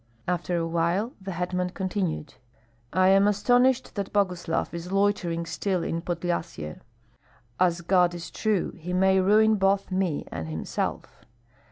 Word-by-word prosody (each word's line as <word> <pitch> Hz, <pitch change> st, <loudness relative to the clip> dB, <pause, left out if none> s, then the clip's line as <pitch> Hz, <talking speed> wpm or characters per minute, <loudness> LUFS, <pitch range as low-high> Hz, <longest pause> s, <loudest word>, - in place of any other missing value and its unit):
After 175 Hz, 0 st, -1 dB
a 165 Hz, -, 0 dB
while 170 Hz, -, 0 dB
the 190 Hz, 0 st, -5 dB
hetman 180 Hz, +1 st, -1 dB
continued: 185 Hz, -6 st, -2 dB, 0.6 s
"I 185 Hz, +2 st, +4 dB
am 195 Hz, +1 st, +5 dB
astonished 245 Hz, +5 st, +3 dB
that 200 Hz, -2 st, -4 dB
Boguslav 180 Hz, -6 st, 0 dB
is 170 Hz, +2 st, -6 dB
loitering 195 Hz, -4 st, +1 dB
still 180 Hz, +2 st, -1 dB
in 165 Hz, -, -2 dB
Podlyasye. 170 Hz, -, -3 dB, 0.8 s
As 175 Hz, -2 st, +2 dB
God 175 Hz, 0 st, +3 dB
is 170 Hz, -1 st, -7 dB
true, 215 Hz, -4 st, 0 dB
he 180 Hz, +2 st, -5 dB
may 190 Hz, +1 st, +4 dB
ruin 215 Hz, +3 st, +4 dB
both 195 Hz, 0 st, +1 dB
me 185 Hz, -5 st, -1 dB
and 80 Hz, -1 st, -5 dB
himself. 80 Hz, 0 st, -4 dB
180 Hz, 140 wpm, -26 LUFS, 170-195 Hz, 0.8 s, am